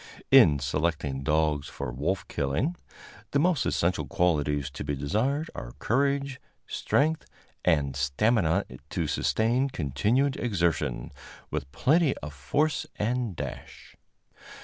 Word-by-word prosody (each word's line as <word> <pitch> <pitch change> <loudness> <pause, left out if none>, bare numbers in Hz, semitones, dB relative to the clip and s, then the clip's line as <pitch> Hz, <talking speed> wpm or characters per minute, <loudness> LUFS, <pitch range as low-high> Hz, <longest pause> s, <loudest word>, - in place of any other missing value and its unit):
In 75 - +8
selecting 70 0 -1
dogs 75 0 +1
for 60 - -5
wolf 75 +10 -2
killing, 70 - -1 0.6
the - - +4
most 170 -1 +2
essential 90 +2 0
qualities 75 -7 +1
to - - -6
be 70 - -2
desired 125 - -1
are - - -7
courage, 140 +2 0 0.2
strength 155 +2 0 0.4
and 75 -6 +2
stamina 85 - +2 0.2
to - - -1
sustain 120 +5 +1
continued 110 - +1
exertion, 85 - -1 0.4
with 65 - -4
plenty 150 - +3
of 75 0 -7
force 140 - 0
and 115 -2 -1
dash. 70 -4 -8
90 Hz, 115 wpm, -27 LUFS, -, 0.6 s, In